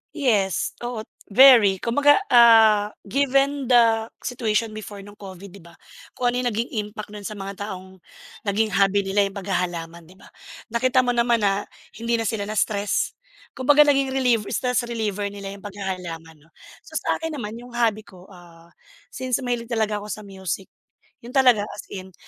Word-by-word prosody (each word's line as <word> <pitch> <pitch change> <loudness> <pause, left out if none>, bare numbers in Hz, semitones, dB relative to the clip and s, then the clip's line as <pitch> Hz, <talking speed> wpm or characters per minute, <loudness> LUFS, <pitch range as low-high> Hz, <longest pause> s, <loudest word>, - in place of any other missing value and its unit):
Yes, 195 - +1
oo, 240 -2 -5 0.2
very. 215 -5 +6
Kumbaga, 285 +5 +4 0.2
ah, 225 -4 +6 0.2
given 275 +3 +1
the 230 -2 +4 0.2
situation 230 -2 -1
before 210 -2 -9
nung 205 +1 -15
Covid, 195 -1 -10
‘di 200 - -13
ba? 170 -1 -17 0.4
Kung 245 -1 +1
ano 245 - -2
yung 250 - -1
naging 230 +3 -3
impact 210 0 -7
nun 205 -1 -7
sa 215 - -7
mga 195 0 -6
taong 190 -1 -9 0.5
naging 215 +2 +1
hobby 195 +1 +2
nila 200 +1 +1
yung 195 - -11
paghahalaman, 175 -4 -4
‘di 185 - -17
ba? 190 - -18 0.4
Nakita 255 +2 +2
mo 245 - +1
naman 235 -2 +1
na 200 0 0 0.3
hindi 230 +1 0
na 225 - -1
sila 215 -2 -2
na-stress, 210 -1 -1 0.3
kumbaga 290 +3 +5
naging 275 -2 +2
relieve 245 -5 +2
stress 250 -1 -1
reliever 210 -3 -2
nila 200 -1 -7
yung 200 -1 -12
paghahalaman, 180 -5 -7
‘no? 155 +3 -25 0.4
So, - - -12
sa - - -1
akin 325 -1 -4
naman, 225 -4 -6
yung 245 0 -12
hobby 225 -3 0
ko, 185 0 -16
ah, 170 -2 -17 0.4
since 255 0 -2
mahilig 240 -2 -2
talaga 220 -3 -1
ako 205 - -9
sa 210 +1 -6
music, 190 -2 -6 0.5
yun 240 +2 -11
talaga 250 -6 +4
as - - -8
in. 190 -1 -8
215 Hz, 170 wpm, -23 LUFS, 195-240 Hz, 0.5 s, very